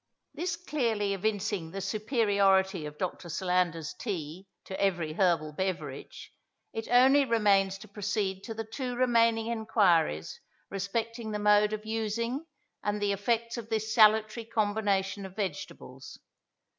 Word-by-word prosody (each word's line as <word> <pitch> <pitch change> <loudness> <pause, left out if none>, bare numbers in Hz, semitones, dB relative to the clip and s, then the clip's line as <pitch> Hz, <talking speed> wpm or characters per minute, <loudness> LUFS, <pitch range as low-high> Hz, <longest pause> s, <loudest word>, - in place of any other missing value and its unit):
This 345 0 -2
clearly 235 - -1
evincing 205 -3 -2
the 195 - -6
superiority 195 - +2
of 150 0 -10
Dr. 175 0 -4
Solander's 175 -2 0
tea 185 -2 -5 0.2
to 190 - -5
every 175 -6 0
herbal 165 -4 +1
beverage, 155 -6 -5 0.4
it 225 - -4
only 265 +4 +6
remains 200 -5 +3
to 215 - -12
proceed 200 -1 -2
to 225 - -6
the 225 - -3
two 245 +3 -5
remaining 230 -2 +3
enquiries 205 - +1 0.3
respecting 220 +4 -3
the 210 - -2
mode 210 0 +4
of 215 0 -4
using 230 +6 -2 0.3
and 205 0 -1
the 205 -1 +1
effects 230 +4 -1
of 230 -1 -7
this 220 0 -1
salutary 215 +1 +4
combination 205 -3 0
of 190 -1 -9
vegetables. 145 -8 -6
205 Hz, 130 wpm, -29 LUFS, 190-225 Hz, 0.4 s, only